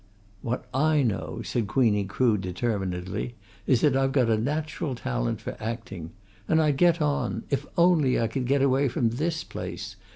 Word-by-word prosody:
"What 120 +2 -3
I 150 +2 +3
know," 115 -5 -2
said 115 -4 -1
Queenie 105 -3 +2
Crood 110 0 +1
determinedly, 95 +2 -3 0.3
"is 125 -4 +3
that 145 -4 +4
I've 135 0 +2
got 125 -5 +3
a - - +4
natural 150 +1 -2
talent - - -2
for - - -6
acting. 110 -7 -5 0.4
And 160 - +3
I'd 150 -3 +2
get 170 0 +4
on 145 -1 -1
if 140 - -1
only 170 -7 +4
I 115 - +2
could 125 +2 -2
get 140 +1 +3
away 135 +1 +3
from 120 -2 +1
this 155 +7 -2
place. 90 +3 -6
125 Hz, 170 wpm, -26 LUFS, 105-145 Hz, 0.4 s, that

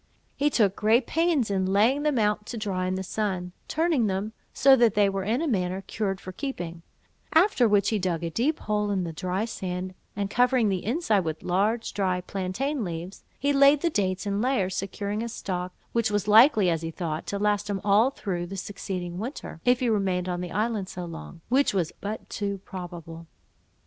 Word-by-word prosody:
He 290 +1 +2
took 205 -8 +2
great 225 +4 +3
pains 320 -9 +1
in 190 -1 +1
laying 220 +9 +3
them 295 -3 +1
out 210 -1 +1
to 240 - -5
dry 190 -4 -2
in 185 - -1
the 190 - -3
sun, 185 -3 -2 0.2
turning 315 -8 +1
them, 200 +3 -2 0.2
so 270 0 +6
that 235 -4 +3
they 205 -1 +4
were 195 -1 -2
in 230 - 0
a - - 0
manner 185 -6 -1
cured 195 -3 -2
for 185 - -8
keeping; 175 - -5 0.5
after 320 - +5
which 205 -2 +3
he 215 - 0
dug 175 -3 -1
a 165 - -2
deep 275 - +1
hole 210 -1 0
in 195 -2 0
the 165 -2 -4
dry 185 +5 -2
sand, 185 -4 -4 0.2
and 200 0 -2
covering 245 -2 +3
the 190 -2 -1
inside 230 - +1
with 160 -3 -4
large 210 +6 0
dry 185 -3 0
plantain 200 +10 -2
leaves, 175 +1 -6
he 285 +1 +1
laid 280 +1 +6
the 340 - +1
dates 190 -6 -1
in 200 0 -1
layers, 230 -8 +1
securing 200 +2 -3
a 235 - -3
stock, 180 -5 -4 0.2
which 230 -2 +1
was 205 -1 -1
likely, 220 -1 +7
as 165 -2 +1
he 165 - -3
thought, 165 -1 -4
to 200 - -2
last 205 0 0
him 200 -1 -1
all 210 +5 +4
through 180 -9 -4
the 195 +2 -6
succeeding 180 -2 -5
winter, 225 - -6
if 245 +1 +4
he 250 - +2
remained 190 -4 0
on 175 -1 -2
the 180 - -4
island 215 -2 -1
so 180 -1 -6
long, 165 - -9
which 260 -2 +2
was 175 -4 0
but 210 +2 -5
too 200 -1 -3
probable. 170 -3 -8
200 Hz, 205 wpm, -26 LUFS, 185-230 Hz, 0.5 s, likely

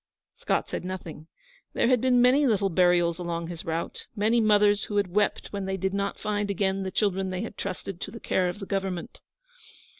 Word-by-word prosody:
Scott - - -1
said - - -4
nothing. 175 -4 -7 0.5
There - - +2
had 250 -2 +3
been 250 -1 +4
many 270 +3 +5
little 200 -4 +1
burials 175 -1 +3
along 170 -1 -3
his 170 -2 -6
route 165 +1 -4
many 225 +3 +2
mothers 205 -1 +4
who 205 - -3
had 190 -3 0
wept 210 0 0
when 200 -1 -3
they 190 0 -2
did 190 +1 -1
not 200 0 -1
find 205 -1 -2
again 195 0 0
the 190 - -2
children 190 -1 0
they 185 0 -3
had 220 - -7
trusted 185 -1 -5
to - - -4
the 230 +3 -9
care 180 -4 +1
of 175 - -5
the 200 - -7
Government. 195 -3 -3
195 Hz, 205 wpm, -27 LUFS, 180-210 Hz, 0.5 s, many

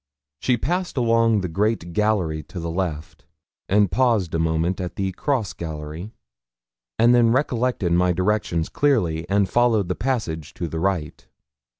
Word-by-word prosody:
She 125 -2 +1
passed 175 +6 -2
along 115 -3 +3
the 90 - -2
great 95 0 -1
gallery 95 -7 +1
to 90 - -6
the 85 0 -4
left, 80 -4 -4 0.4
and 100 -1 +3
paused 115 -9 +1
a 80 - 0
moment 80 +3 0
at 90 - -5
the 95 -1 -1
cross 110 - -1
gallery, 80 +3 -6 0.9
and 120 +1 +5
then 120 -1 +5
recollected 125 - 0
my 90 +1 +3
directions 90 -2 0
clearly, 85 - 0
and 100 0 +2
followed 110 -3 +2
the - - +1
passage 100 - -3
to 85 - -3
the 80 +1 -4
right. 90 -4 -2
95 Hz, 155 wpm, -23 LUFS, 85-115 Hz, 0.9 s, and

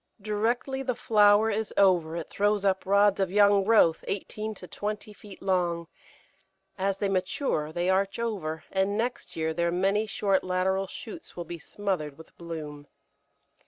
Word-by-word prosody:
Directly 225 +6 -1
the 255 -2 -1
flower 210 0 +4
is 220 +1 -2
over 175 -5 +4
it 165 - -6
throws 205 0 +1
up 190 -1 +1
rods 200 0 +4
of 190 -2 +1
young 200 0 +5
growth 195 -6 +4
eighteen 215 +2 -4
to 180 - -11
twenty 210 +2 -5
feet 205 -2 -13
long; 175 -3 0 0.9
as 195 0 -1
they 200 - 0
mature 185 - -1
they 175 +2 -1
arch 195 +1 +1
over, 190 -9 -3
and 195 +1 +1
next 240 +2 -3
year 160 0 -1
their 170 +1 0
many 195 +4 +1
short 195 -2 +1
lateral 190 +1 0
shoots 220 - -9
will 175 - -5
be 170 +1 -7
smothered 160 -5 -3
with 160 - -15
bloom. 150 -4 -7
195 Hz, 160 wpm, -27 LUFS, 175-210 Hz, 0.9 s, young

